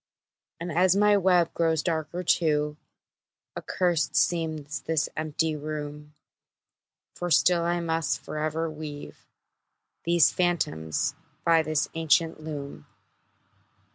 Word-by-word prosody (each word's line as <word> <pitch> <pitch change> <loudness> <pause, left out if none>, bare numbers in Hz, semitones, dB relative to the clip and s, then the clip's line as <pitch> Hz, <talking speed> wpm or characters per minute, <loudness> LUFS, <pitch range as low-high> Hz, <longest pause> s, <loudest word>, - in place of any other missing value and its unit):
And 170 +1 -4
as 180 +3 +3
my 205 +1 +5
web 180 -3 +3
grows 160 -2 +1
darker 165 +1 -2
too, 150 -3 +1 0.8
Accursed 175 -3 0
seems 155 -4 0
this 160 0 0
empty 155 +1 -1
room; 150 0 -6 1.0
For 175 - -4
still 175 +1 +4
I 175 +1 0
must 160 -4 -1
forever 155 +3 -3
weave 155 -2 -8 0.8
These 170 -2 +4
phantoms 80 - 0 0.3
by 165 -1 +5
this 155 -1 0
ancient 165 0 +1
loom. 140 - -7
160 Hz, 105 wpm, -27 LUFS, 150-170 Hz, 1.0 s, my